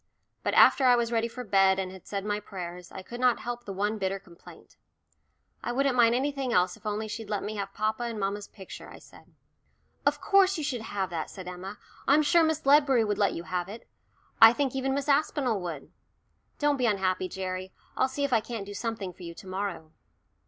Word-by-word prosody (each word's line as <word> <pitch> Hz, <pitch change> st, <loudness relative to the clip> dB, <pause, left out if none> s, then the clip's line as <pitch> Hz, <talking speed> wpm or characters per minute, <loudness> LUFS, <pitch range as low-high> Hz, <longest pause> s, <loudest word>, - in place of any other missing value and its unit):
But -, -, -1 dB
after 270 Hz, -, +6 dB
I 250 Hz, -1 st, +7 dB
was 235 Hz, -1 st, 0 dB
ready 230 Hz, 0 st, +1 dB
for 250 Hz, +2 st, -7 dB
bed 195 Hz, -3 st, +4 dB
and 190 Hz, -1 st, -3 dB
had 190 Hz, -2 st, -13 dB
said 200 Hz, -1 st, -4 dB
my 210 Hz, 0 st, -1 dB
prayers, 180 Hz, -3 st, -8 dB
I -, -, -8 dB
could 240 Hz, +5 st, -8 dB
not 250 Hz, -2 st, +3 dB
help 240 Hz, 0 st, -5 dB
the 200 Hz, -, -5 dB
one 205 Hz, +3 st, -1 dB
bitter 195 Hz, 0 st, -1 dB
complaint. 175 Hz, -3 st, -16 dB, 0.9 s
"I 240 Hz, -, -2 dB
wouldn't 270 Hz, +1 st, +1 dB
mind 235 Hz, -1 st, +5 dB
anything 270 Hz, -1 st, -1 dB
else 180 Hz, -3 st, +2 dB
if -, -, -10 dB
only 210 Hz, +1 st, -2 dB
she'd 220 Hz, 0 st, -6 dB
let 205 Hz, -2 st, -2 dB
me 215 Hz, -, -4 dB
have 195 Hz, -1 st, -4 dB
papa 215 Hz, +3 st, -1 dB
and 230 Hz, -2 st, -4 dB
mamma's 200 Hz, +1 st, -2 dB
picture," 190 Hz, -, -11 dB
I -, -, -11 dB
said. -, -, -18 dB, 0.7 s
"Of -, -, +2 dB
course 390 Hz, -2 st, +4 dB
you 310 Hz, -, -3 dB
should 255 Hz, -5 st, -2 dB
have 200 Hz, -4 st, -3 dB
that," 165 Hz, -2 st, -3 dB
said 185 Hz, -2 st, -9 dB
Emma. 185 Hz, +3 st, -7 dB, 0.3 s
"I'm 295 Hz, +3 st, +5 dB
sure 340 Hz, +3 st, +4 dB
Miss 315 Hz, -2 st, 0 dB
Ledbury 275 Hz, -4 st, +5 dB
would 210 Hz, -1 st, -1 dB
let 200 Hz, -2 st, +3 dB
you 170 Hz, -, -5 dB
have 180 Hz, 0 st, -3 dB
it. 220 Hz, +3 st, -10 dB, 0.5 s
I 225 Hz, +1 st, +10 dB
think 270 Hz, -1 st, -1 dB
even 265 Hz, 0 st, 0 dB
Miss 280 Hz, 0 st, -2 dB
Aspinall 280 Hz, -6 st, +1 dB
would. 165 Hz, -5 st, -6 dB, 0.7 s
Don't 290 Hz, -1 st, +2 dB
be 250 Hz, -2 st, +1 dB
unhappy, 185 Hz, -3 st, 0 dB
Gerry, 185 Hz, 0 st, -5 dB, 0.2 s
I'll 260 Hz, -, +2 dB
see 285 Hz, +2 st, -3 dB
if 280 Hz, -2 st, 0 dB
I 230 Hz, -, +5 dB
can't 225 Hz, -3 st, -6 dB
do 205 Hz, -, -8 dB
something 215 Hz, -4 st, -4 dB
for 185 Hz, -, -18 dB
you 170 Hz, -1 st, -8 dB
to -, -, -12 dB
morrow." 185 Hz, -4 st, -4 dB
215 Hz, 220 wpm, -28 LUFS, 190-255 Hz, 0.9 s, I